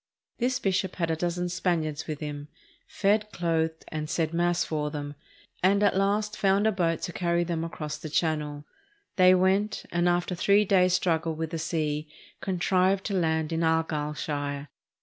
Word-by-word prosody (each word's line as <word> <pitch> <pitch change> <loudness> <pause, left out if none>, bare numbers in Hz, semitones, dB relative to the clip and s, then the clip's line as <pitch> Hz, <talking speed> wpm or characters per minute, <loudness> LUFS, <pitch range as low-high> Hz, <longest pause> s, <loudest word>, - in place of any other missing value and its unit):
This 250 +1 +1
bishop 190 -3 -1
had 170 -2 -1
a - - +1
dozen 175 +2 -1
Span 175 -2 0
iards 155 -2 -5
with 155 -1 -5
him, 145 -1 -5 0.4
fed, 210 +1 +1
clothed, 160 -2 -1
and 155 -1 -4
said 160 0 -1
Mass 175 0 +2
for 150 -1 -2
them, 145 -1 -5 0.5
and 200 +3 +3
at 205 - +3
last 205 +2 +1
found 195 +1 +2
a 220 - +4
boat 170 -4 0
to 175 - -3
carry 170 0 +1
them 170 -1 -2
across 155 -2 -5
the 155 - -6
Chan 155 0 +1
nel. 145 0 -7 0.5
They 185 0 +7
went, 190 +3 +1
and 175 +1 +2
after 175 +1 0
a - - -3
three 200 +4 +4
days' 185 -2 +4
struggle 165 -3 0
with 160 0 -4
the 165 - -3
sea 155 -2 -2 0.3
contrived 185 +1 +1
to 205 - -2
land 160 -3 0
in 165 - 0
Argyllshire. 150 -3 -1
170 Hz, 180 wpm, -27 LUFS, 155-185 Hz, 0.5 s, They